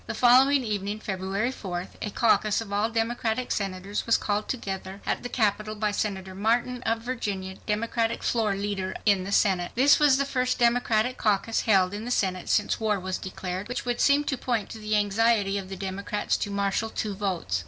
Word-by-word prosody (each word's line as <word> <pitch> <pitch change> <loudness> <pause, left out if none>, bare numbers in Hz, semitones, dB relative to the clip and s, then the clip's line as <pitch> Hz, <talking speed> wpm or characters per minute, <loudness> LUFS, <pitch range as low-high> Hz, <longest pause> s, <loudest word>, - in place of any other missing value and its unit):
The - - -4
following 260 +3 +5
evening, 205 -1 -3
February 195 +4 -2
4th, 185 -7 -5
a 210 - -2
caucus 215 -1 +2
of 215 -3 -6
all 210 +2 +1
Democratic 230 +1 -1
Senators 195 +1 -3
was 230 - +5
called 210 0 -2
together 195 -5 -5
at - - -1
the 245 - -5
Capitol 215 -2 0
by 210 0 0
Senator 190 -2 -3
Martin 235 +5 0
of 225 0 0
Virginia, 200 -6 -4
Democratic 225 +2 -1
floor 220 -4 +1
leader 195 -1 -3
in 200 -3 +3
the 200 - -5
Senate. 185 -4 +2
This 270 +4 +5
was 290 -3 +5
the 280 - +1
first 255 -2 0
Democratic 240 0 +2
caucus 215 +1 +1
held 190 -2 +4
in 210 +1 -5
the 240 - -5
Senate 185 -6 -1
since - - +1
war 215 -2 +1
was 185 0 -3
declared, 185 +1 -5
which 245 +1 -4
would 245 -1 -1
seem 285 +1 +4
to 275 -2 -2
point 230 -5 -2
to 225 - -8
the 215 0 -1
anxiety 205 -1 +2
of 190 -1 -9
the 195 - -5
Democrats 200 +2 -2
to - - -3
marshal 200 +2 -1
two 215 -2 -3
votes. 185 - -2
210 Hz, 195 wpm, -26 LUFS, 195-230 Hz, -, following